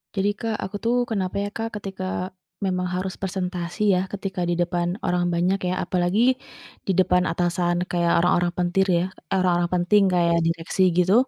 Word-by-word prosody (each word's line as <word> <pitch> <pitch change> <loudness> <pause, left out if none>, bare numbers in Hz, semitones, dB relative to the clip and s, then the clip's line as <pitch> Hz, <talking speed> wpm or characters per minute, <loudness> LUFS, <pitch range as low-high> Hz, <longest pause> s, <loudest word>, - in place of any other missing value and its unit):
Jadi 200 +1 +2
Kak, 225 -2 -1
aku 190 - -7
tuh 235 +1 +2
kenapa 195 -3 -2
ya, 200 0 -1
Kak, 225 0 -3
ketika 190 -2 -4 0.3
memang 180 -1 0
harus 185 0 -2
presentasi 185 +1 -1
ya, 180 - +3
ketika 195 -2 -4
di 175 - 0
depan 175 0 0 0.2
orang 180 0 +1
banyak 180 +3 +1
ya, - - 0
apalagi 180 +2 0 0.7
di - - +1
depan 180 -1 +4
atasan 175 +1 0
kayak 170 -1 +1
orang-orang 175 0 +3
pentir 180 +2 +2
ya, 170 - +1 0.3
eh, 195 - +2
orang-orang 175 -1 +2
penting 180 +4 +4
kayak 170 -1 +3
direksi 165 +2 -1 0.2
gitu, 180 +1 +4
180 Hz, 170 wpm, -24 LUFS, 175-195 Hz, 0.7 s, depan